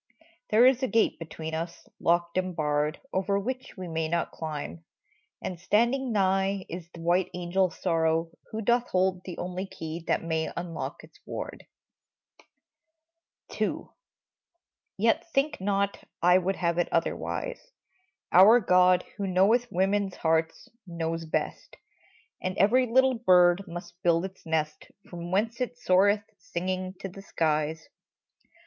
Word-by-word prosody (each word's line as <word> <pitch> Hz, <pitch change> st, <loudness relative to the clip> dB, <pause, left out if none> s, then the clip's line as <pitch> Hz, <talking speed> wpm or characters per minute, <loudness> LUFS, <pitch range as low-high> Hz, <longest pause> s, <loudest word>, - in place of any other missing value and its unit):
There 225 Hz, +3 st, +6 dB
is 260 Hz, 0 st, +5 dB
a 260 Hz, -, +1 dB
gate 230 Hz, -2 st, +2 dB
between 160 Hz, -1 st, -7 dB
us, 165 Hz, +2 st, -5 dB
locked 170 Hz, 0 st, +1 dB
and 185 Hz, -1 st, -1 dB
barred. 150 Hz, -1 st, 0 dB
Over 200 Hz, +1 st, +1 dB
which 255 Hz, +5 st, -5 dB
we 185 Hz, -1 st, -6 dB
may 160 Hz, -1 st, -1 dB
not 170 Hz, 0 st, -1 dB
climb; 145 Hz, -, -6 dB, 0.6 s
and 180 Hz, -2 st, -4 dB
standing 235 Hz, +8 st, +1 dB
nigh 195 Hz, -1 st, +1 dB
Is 170 Hz, 0 st, -7 dB
the 170 Hz, -, -11 dB
white 175 Hz, +2 st, +2 dB
angel 180 Hz, +1 st, +1 dB
Sorrow, 165 Hz, -2 st, 0 dB, 0.2 s
who 220 Hz, -, -4 dB
doth 240 Hz, +3 st, +2 dB
hold 185 Hz, 0 st, +1 dB
The 180 Hz, -, -7 dB
only 180 Hz, +2 st, -4 dB
key 165 Hz, -3 st, -7 dB
that -, -, +1 dB
may 160 Hz, -1 st, -1 dB
unlock 170 Hz, -2 st, -5 dB
its -, -, -17 dB
ward! -, -, -7 dB, 1.9 s
II. -, -, -1 dB, 1.1 s
Yet 230 Hz, -, +1 dB
think 275 Hz, -5 st, +1 dB
not 200 Hz, 0 st, 0 dB, 0.2 s
I 180 Hz, +1 st, +5 dB
would 190 Hz, +2 st, -1 dB
have 170 Hz, -1 st, 0 dB
it 175 Hz, -, +1 dB
otherwise! -, -, -2 dB, 0.6 s
Our 205 Hz, +7 st, +8 dB
God, 180 Hz, -3 st, +4 dB
who 200 Hz, -2 st, -2 dB
knoweth 210 Hz, +6 st, +3 dB
women's 195 Hz, +1 st, +1 dB
hearts, 160 Hz, 0 st, 0 dB, 0.2 s
knows 165 Hz, -1 st, -3 dB
best -, -, -3 dB, 0.6 s
And 185 Hz, 0 st, -3 dB
every 245 Hz, +7 st, +4 dB
little 260 Hz, +1 st, +3 dB
bird 180 Hz, -2 st, +4 dB
must 175 Hz, +1 st, -9 dB
build 170 Hz, 0 st, +2 dB
its 190 Hz, -3 st, -10 dB
nest 155 Hz, -1 st, -2 dB, 0.2 s
From 175 Hz, -1 st, -6 dB
whence 220 Hz, +6 st, 0 dB
it 245 Hz, -1 st, -2 dB
soareth, 200 Hz, +1 st, +3 dB, 0.2 s
singing, 185 Hz, +1 st, -3 dB
to -, -, -3 dB
the 195 Hz, +1 st, -11 dB
skies. 155 Hz, -3 st, -1 dB
185 Hz, 140 wpm, -28 LUFS, 170-200 Hz, 1.9 s, Our